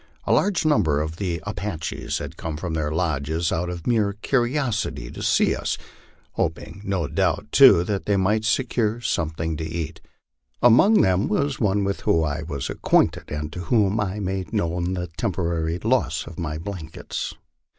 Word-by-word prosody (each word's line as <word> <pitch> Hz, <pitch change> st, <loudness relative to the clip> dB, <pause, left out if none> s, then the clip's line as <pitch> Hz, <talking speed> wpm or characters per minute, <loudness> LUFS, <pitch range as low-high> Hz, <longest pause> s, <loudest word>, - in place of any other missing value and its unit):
A -, -, +2 dB
large 195 Hz, -5 st, +2 dB
number 95 Hz, -, +3 dB
of 80 Hz, +2 st, -3 dB
the 90 Hz, -4 st, -3 dB
Apaches 100 Hz, -4 st, -3 dB
had -, -, -6 dB
come 80 Hz, -2 st, -5 dB
from 85 Hz, +1 st, -4 dB
their 75 Hz, -2 st, -1 dB
lodges 80 Hz, 0 st, -1 dB
out 90 Hz, +2 st, -1 dB
of 85 Hz, -2 st, -6 dB
mere 110 Hz, -4 st, +2 dB
curiosity 120 Hz, -, -1 dB
to -, -, -8 dB
see -, -, +3 dB
us, -, -, -2 dB, 0.5 s
hoping 100 Hz, -, -3 dB
no 95 Hz, -6 st, -1 dB
doubt -, -, 0 dB
too 85 Hz, -, +8 dB
that 100 Hz, +1 st, -3 dB
they 100 Hz, -1 st, +3 dB
might 105 Hz, +3 st, +2 dB
secure 115 Hz, -1 st, +1 dB
some 85 Hz, -8 st, 0 dB
thing 80 Hz, 0 st, -3 dB
to 80 Hz, -, -4 dB
eat. 80 Hz, 0 st, -4 dB, 0.6 s
Among 125 Hz, -, +6 dB
them 95 Hz, +2 st, +2 dB
was 140 Hz, +6 st, 0 dB
one 105 Hz, -2 st, +2 dB
with 100 Hz, 0 st, -2 dB
whom 80 Hz, -, +2 dB
I 75 Hz, +1 st, -2 dB
was. 75 Hz, -4 st, -4 dB
acquainted, -, -, +1 dB
and 75 Hz, +1 st, -4 dB
to 90 Hz, -1 st, -6 dB
whom 105 Hz, -1 st, +2 dB
I 105 Hz, 0 st, -2 dB
made 95 Hz, -3 st, -3 dB
known 85 Hz, +2 st, 0 dB
the 90 Hz, -1 st, -2 dB
temporary 85 Hz, -1 st, -2 dB
loss 105 Hz, -, 0 dB
of 85 Hz, +1 st, -10 dB
my 80 Hz, -3 st, -3 dB
blankets. 80 Hz, -2 st, -6 dB
90 Hz, 170 wpm, -24 LUFS, 80-105 Hz, 0.6 s, too